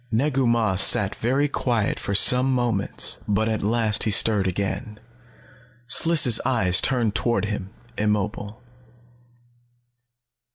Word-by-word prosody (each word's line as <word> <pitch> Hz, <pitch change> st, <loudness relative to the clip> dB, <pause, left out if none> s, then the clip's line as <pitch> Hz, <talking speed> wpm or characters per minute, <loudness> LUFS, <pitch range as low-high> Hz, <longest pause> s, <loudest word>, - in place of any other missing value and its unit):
Negu 130 Hz, +2 st, -1 dB
Mah 115 Hz, -5 st, -1 dB
sat 100 Hz, +1 st, +4 dB
very 135 Hz, +5 st, -2 dB
quiet 120 Hz, -6 st, -3 dB
for 100 Hz, -, -5 dB
some 125 Hz, +6 st, +4 dB
moments. 120 Hz, -6 st, -1 dB
But 105 Hz, +2 st, -1 dB
at 110 Hz, -1 st, -3 dB
last 110 Hz, 0 st, 0 dB
he -, -, -1 dB
stirred 105 Hz, -1 st, +2 dB
again. 100 Hz, +4 st, -6 dB, 0.9 s
Sliss' 130 Hz, -3 st, +4 dB
eyes 95 Hz, -8 st, +1 dB
turned 120 Hz, -5 st, -1 dB
toward 120 Hz, 0 st, -2 dB
him, 100 Hz, -2 st, -7 dB, 0.3 s
immobile. 105 Hz, +1 st, -4 dB
110 Hz, 115 wpm, -21 LUFS, 105-120 Hz, 0.9 s, sat